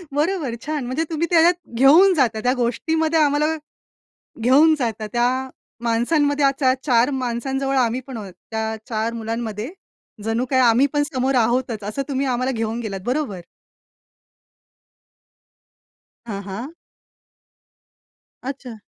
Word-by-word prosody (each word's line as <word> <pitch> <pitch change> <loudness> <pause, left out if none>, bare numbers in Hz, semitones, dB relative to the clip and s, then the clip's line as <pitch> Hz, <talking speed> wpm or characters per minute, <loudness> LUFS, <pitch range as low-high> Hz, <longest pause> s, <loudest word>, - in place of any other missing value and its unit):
बरोबर, 300 -5 0
छान 300 -4 -2
म्हणजे 260 +6 -1
तुम्ही 330 +1 -1
त्याच्यात 340 +1 +6 0.2
घेऊन 320 +10 +7
जाता, 255 -9 +1
त्या 250 - +3
गोष्टीमध्ये 315 +6 0
आम्हाला 295 0 +3 1.0
घेऊन 280 +7 +5
जाता. 220 -3 -2
त्या 240 0 +3 0.5
माणसांमध्ये 285 +5 +2
आता 275 -1 +3
4 245 -2 +3
माणसांजवळ 270 +3 -2
आम्ही 245 -1 +2
पण 260 -3 -6
आहोत. 200 -4 -8 0.2
त्या 220 0 -2
4 225 0 -1
मुलांमध्ये 225 +1 -4 0.5
जणू 225 +3 0
काय 260 - +3
आम्ही 245 +1 +5
पण 290 0 +2
समोर 260 +1 +1
आहोतच. 235 -2 +1
असं 210 +7 -3
तुम्ही 275 0 0
आम्हाला 255 0 0
घेऊन 225 -1 -2
गेलात. 200 -4 -4
बरोबर. 250 -8 -2 2.8
हां, 200 -4 -5
हां. 220 +10 -6 1.7
अच्छा. 255 -3 -6
255 Hz, 120 wpm, -21 LUFS, 230-285 Hz, 2.8 s, घेऊन